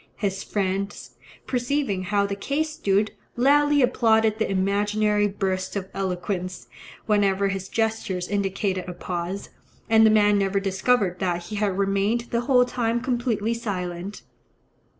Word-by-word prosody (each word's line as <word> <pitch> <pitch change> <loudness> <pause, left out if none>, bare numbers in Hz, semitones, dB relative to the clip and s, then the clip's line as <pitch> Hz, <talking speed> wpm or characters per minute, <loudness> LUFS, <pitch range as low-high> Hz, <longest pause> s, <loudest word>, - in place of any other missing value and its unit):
His 195 -2 -2
friends, 195 -7 -3 0.3
perceiving 245 -6 -1
how 200 +1 +1
the 200 - -3
case 290 +9 -1
stood, 205 -7 +1 0.2
loudly 290 +3 +4
applauded 220 -3 +3
the 220 - 0
imaginary 205 +2 +1
bursts 190 -1 -2
of 190 -1 -4
eloquence, 185 -1 -3 0.4
whenever 200 -2 +2
his 195 -1 -4
gestures 220 -5 -1
indicated 195 -2 -1
a - - -5
pause, 180 +2 -5 0.4
and 220 0 +7
the 220 - +7
man 210 -1 +4
never 195 0 +1
discovered 195 0 +1
that 175 -2 -1
he 210 +4 -6
had 200 -2 0
remained 200 +4 +1
the 235 - +1
whole 250 0 +4
time 240 -2 -1
completely 235 -3 -1
silent. 190 -4 -5
200 Hz, 135 wpm, -24 LUFS, 190-225 Hz, 0.4 s, and